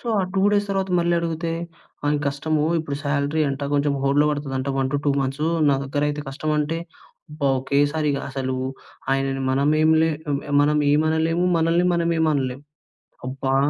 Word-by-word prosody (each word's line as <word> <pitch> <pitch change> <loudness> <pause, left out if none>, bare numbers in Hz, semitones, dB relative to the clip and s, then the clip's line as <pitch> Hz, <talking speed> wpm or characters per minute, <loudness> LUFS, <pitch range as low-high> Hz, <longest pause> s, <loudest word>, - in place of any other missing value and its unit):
So - - -13
ఆ - - +3
2 190 - +2
days 205 0 +2
తరువాత 195 -1 -1
మళ్ళీ 170 0 +2
అడిగితే, 165 0 -2 0.5
ఆయన 145 0 +2
"కష్టము 150 +2 -1 0.2
ఇప్పుడు 145 -3 -4
సాలరీ 145 +2 0
అంట 140 +1 -4
కొంచెం 145 0 +1
హోల్డ్‌లో 140 +2 +3
పడతదంట 140 -2 -3
1-2 140 +2 0
మంత్సు 135 +4 -1 0.2
నా 140 - +3
దగ్గరైతే 145 +2 -1
కష్టం" 155 +3 -3
అంటే, 150 +2 -1 0.5
అబ్బా! 150 -2 -1
ఒకేసారిగ 145 +2 +1
అసలు 130 -1 -3 0.6
ఆయనను 135 0 -1
మనమేంలే 155 +4 +3 0.5
మనం 150 +1 +2 0.2
ఏం 150 +1 +4
అనలేము. 165 +2 +1
మనల్ని 165 +2 +2
మనమేం 170 -1 +1
అనలేము 135 0 -2 0.6
అబ్బా 135 0 -1
145 Hz, 145 wpm, -23 LUFS, 140-160 Hz, 0.6 s, ఏం